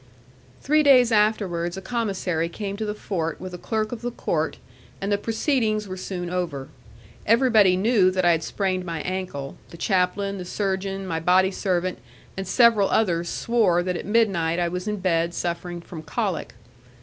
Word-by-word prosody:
Three 305 +3 +3
days 255 -5 +6
afterwards, 195 -5 +1
a - - -3
commissary 190 -7 -2
came 200 +2 -5
to 220 +1 -3
the 210 0 -3
fort 165 -6 -3
with 185 -1 -7
a 180 - -7
clerk 215 +1 -2
of 240 -2 -6
the 240 - -2
court, 240 - -2 0.4
and 200 +1 -3
the 205 - +3
proceedings 220 -2 0
were 185 - -5
soon 185 -1 -5
over. 165 -7 -3 0.6
Everybody 220 -5 +5
knew 200 -2 +4
that 185 -1 0
I 175 - +6
had 165 -1 +1
sprained 185 +1 -1
my 165 -3 -4
ankle; 185 -7 -4
the 170 - -11
chaplain, 195 +2 0
the - - -4
surgeon, 195 0 -2
my 165 -3 -2
body 185 +3 +3
servant, 185 -2 -1 0.4
and 190 -1 -5
several 230 -3 +4
others 175 -5 +1
swore 205 -7 +2
that 180 0 -2
at - - -5
midnight 195 -7 +2
I 175 -1 +1
was 180 +3 -4
in 210 0 -1
bed 170 -2 +1
suffering 175 0 -3
from 170 -1 -9
colic. 185 - -3
190 Hz, 175 wpm, -24 LUFS, 175-215 Hz, 0.6 s, days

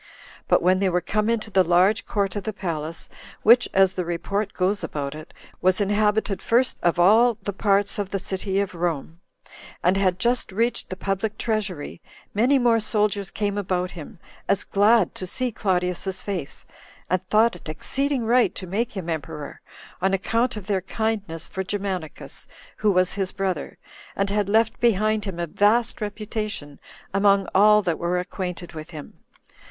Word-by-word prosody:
But - - +3
when 185 +1 +4
they 195 -1 +2
were 180 0 +1
come 210 +5 -1
into 220 -2 -1
the 190 -1 +4
large 180 +5 +3
court 200 -2 -1
of 205 - -3
the 220 - -2
palace, 165 -4 -4 0.4
[which, 240 +3 +6
as 190 -1 +4
the 185 - -2
report 195 +4 -2
goes 195 +3 0
about 140 -1 -3
it, 155 +2 -10 0.3
was 185 +1 +3
inhabited 210 0 +1
first 250 +2 +1
of 170 -1 +2
all 220 +6 +5
the 200 - -3
parts 200 +1 +2
of 200 -2 -2
the 195 - -1
city 190 +1 -2
of 200 -2 -2
Rome,] 165 -2 -3 0.6
and 180 +3 +3
had 185 -2 +2
just 240 +2 0
reached 230 +5 -1
the 185 - -4
public 195 +3 -2
treasury, 200 -9 -3 0.3
many 245 +7 +3
more 240 -3 +3
soldiers 210 -2 0
came 205 -1 -2
about 180 -2 -1
him, 175 +5 -10 0.3
as 200 - +2
glad 205 0 +3
to 185 - -6
see 250 +6 -1
Claudius's 185 -1 -1
face, 185 -8 -5 0.4
and 185 -1 +1
thought 215 +3 +3
it 170 - -10
exceeding 265 - -2
right 235 -3 +3
to 185 - -6
make 210 +6 -2
him 180 -3 -5
emperor, 160 -2 -5 0.4
on 190 +1 +2
account 230 +5 0
of 205 - -7
their 195 -2 0
kindness 200 -5 -3
for 190 - -4
Germanicus, 190 -5 -5 0.3
who 215 - +2
was 185 -1 +2
his 195 -2 -2
brother, 190 -6 -3 0.4
and 195 0 0
had 205 -1 0
left 220 +1 +2
behind 215 -2 +2
him 190 -4 -5
a 170 - -1
vast 215 +8 +2
reputation 210 -8 -4 0.3
among 195 -1 +3
all 210 +2 +6
that 170 -4 -1
were 175 +1 0
acquainted 180 -1 -5
with 155 0 -8
him. 155 -4 -9
195 Hz, 170 wpm, -24 LUFS, 180-215 Hz, 0.6 s, which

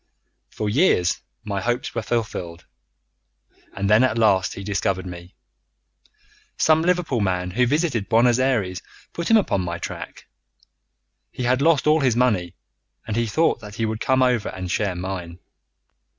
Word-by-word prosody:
"For 105 - -4
years 105 - +2 0.2
my 100 -2 -3
hopes 120 +4 -2
were 115 - -2
fulfilled, 100 -7 -4 1.1
and 100 0 -1
then 105 +4 +5
at 115 -3 +1
last 100 -4 +2
he 100 - -7
discovered 95 -2 -1
me. 90 0 -10 1.2
Some 160 0 +4
Liverpool 175 -7 0
man 90 -2 -1
who 125 +6 +2
visited 145 - 0
Buenos 120 +1 +4
Ayres 105 -9 0 0.3
put 170 - -3
him 225 - +7
upon 185 - +1
my 85 -1 -3
track. - - -8 1.1
He 125 - -5
had 125 +2 +2
lost 155 -3 +3
all 155 +1 +4
his 130 -5 +2
money, 105 -9 +1 0.5
and 110 -2 -3
he 115 0 0
thought 160 +10 +1
that 105 -1 -10
he 115 - -1
would 110 0 -3
come 130 +1 +2
over 125 -4 +1
and 95 -1 -6
share 95 -1 -1
mine. 90 -2 -5
110 Hz, 155 wpm, -22 LUFS, 95-130 Hz, 1.2 s, him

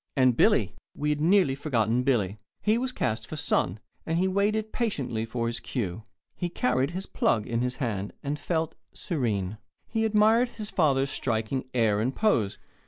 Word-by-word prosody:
And 130 -2 +5
Billy! - - +3 0.2
We 150 +1 0
had 150 0 -1
nearly 175 -3 +4
forgotten 125 -5 +1
Billy. 110 -6 +1 0.2
He 215 +2 +3
was 255 +1 -1
cast 110 - -2
for - - -6
Son, 110 - 0 0.2
and 165 +1 -1
he 185 +2 +2
waited 210 +3 0
patiently 135 - -1
for 115 +1 -2
his 115 0 -1
cue. 110 -5 -3 0.3
He 175 - -2
carried 130 -3 +1
his 185 +3 -4
"plug" 110 -3 +1
in 115 0 -1
his 125 0 -1
hand, 105 -7 -2
and 145 +1 -2
felt 160 -2 -1 0.2
serene. 110 - -2 0.3
He 225 -1 -1
admired 220 +3 +4
his 215 -3 -7
father's 140 -5 +2
striking 120 +2 -1
air 110 -4 +3
and 130 +4 -1
pose. 125 - +2
135 Hz, 170 wpm, -27 LUFS, 115-185 Hz, 0.3 s, And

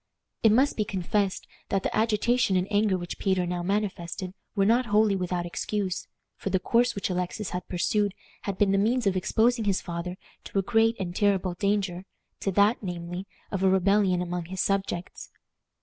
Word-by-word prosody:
It 220 - +6
must 265 +6 +3
be 215 - +2
confessed 195 0 -1 0.2
that 195 -1 0
the - - -1
agitation 225 0 +2
and 180 +1 0
anger 205 -2 +3
which 175 -1 -6
Peter 190 -2 +1
now 175 0 -2
manifested 185 -1 -2 0.2
were 195 -2 +3
not 235 +4 +3
wholly 210 -1 +3
without 180 -2 -2
excuse, 185 +3 -3 0.3
for - - -4
the 190 - +2
course 235 +5 +2
which 200 -1 -2
Alexis 180 +3 -3
had 180 0 -4
pursued 200 +3 0 0.3
had 195 -2 -4
been 200 -2 +3
the 195 - +3
means 235 +4 +1
of 195 -1 +2
exposing 220 +5 +2
his 195 -2 +2
father 175 +1 -5 0.3
to - - -5
a 195 - +3
great 225 +3 +3
and 175 -2 -4
terrible 195 -3 +2
danger 195 -1 -1 0.3
to 195 - -1
that, 205 +4 +4
namely, 175 0 -5 0.2
of 195 - -2
a 190 - +4
rebellion 190 -1 +3
among 175 -1 -3
his 185 +2 -6
subjects. 195 -3 -2
195 Hz, 180 wpm, -27 LUFS, 180-210 Hz, 0.3 s, It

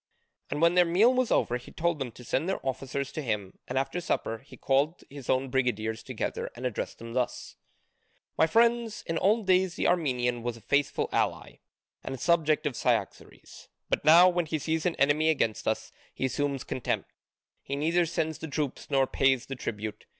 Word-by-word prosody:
And 150 +3 -1
when 170 +1 +5
their 180 0 +6
meal 190 +9 +4
was 255 -2 +1
over 120 - +2
he 125 - -13
told 170 -1 -1
them 130 -3 -3
to 125 - -12
send 145 +8 -1
their 195 - -1
officers 135 +1 -3
to 155 - -4
him, 105 -7 -3
and 130 - -3
after 135 +6 -1
supper 115 -9 -2
he 135 - -15
called 140 +5 +1
his 140 -3 -10
own 130 0 +1
brigadiers 110 -4 0
together 130 -4 -4
and 125 +2 -6
addressed 125 -5 -3
them 115 0 -9
thus: 125 -1 -2 0.8
"My 160 - +4
friends, 230 +1 +2
in 165 0 -1
old 215 +2 +2
days 185 -1 +3
the - - 0
Armenian 125 -8 +1
was 120 0 -3
a - - -15
faithful 140 +3 +1
ally - - -1 0.5
and 135 - -5
subject 155 0 +2
of 145 -4 -1
Cyaxares, - - -3 0.2
but - - +1
now 165 +4 +8
when 175 -2 +1
he 155 - -1
sees 160 +3 -1
an 175 - -1
enemy 150 +3 +3
against 115 -8 0
us, 110 - -1 0.2
he - - -1
assumes 140 0 -1
contempt: 130 - -3 0.5
he 140 - -4
neither 165 +4 +2
sends 160 -1 -2
the 160 - -5
troops 145 -2 -3
nor 135 -2 +3
pays 135 -2 +2
the 135 - -6
tribute. 110 -3 -5
140 Hz, 190 wpm, -28 LUFS, 125-170 Hz, 0.8 s, now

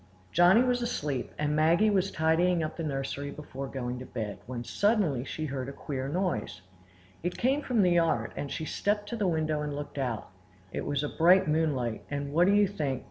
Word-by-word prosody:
Johnny 180 +7 +6
was 250 -1 +1
asleep, 145 - -2
and 150 0 0
Maggie 170 +8 +4
was 195 -1 +2
tidying 165 +1 +2
up 155 - -4
the - - -5
nursery 140 -1 -3
before 140 -2 -7
going 125 -2 -4
to 130 - -7
bed, 105 -3 -5
when 120 -1 -4
suddenly 185 - +1
she 155 +3 -4
heard 135 -2 -4
a - - -5
queer 135 -2 -4
noise. 175 - -2 0.6
It 175 +1 -3
came 270 +4 +2
from 245 -7 +2
the 180 - +4
yard, 170 -2 +2
and 140 - -4
she 160 - -3
stepped 205 +5 -1
to 235 - -3
the 210 -4 0
window 155 -3 0
and 150 -1 -3
looked 145 0 -6
out. 120 -5 -2 0.4
It - - -4
was 145 0 0 0.2
bright 180 +3 +6
moonlight; 145 -7 0
and 145 0 -3
what 175 +3 +4
do 200 - +5
you 205 0 +5
think? 145 -9 -2
155 Hz, 200 wpm, -29 LUFS, 140-185 Hz, 0.6 s, Johnny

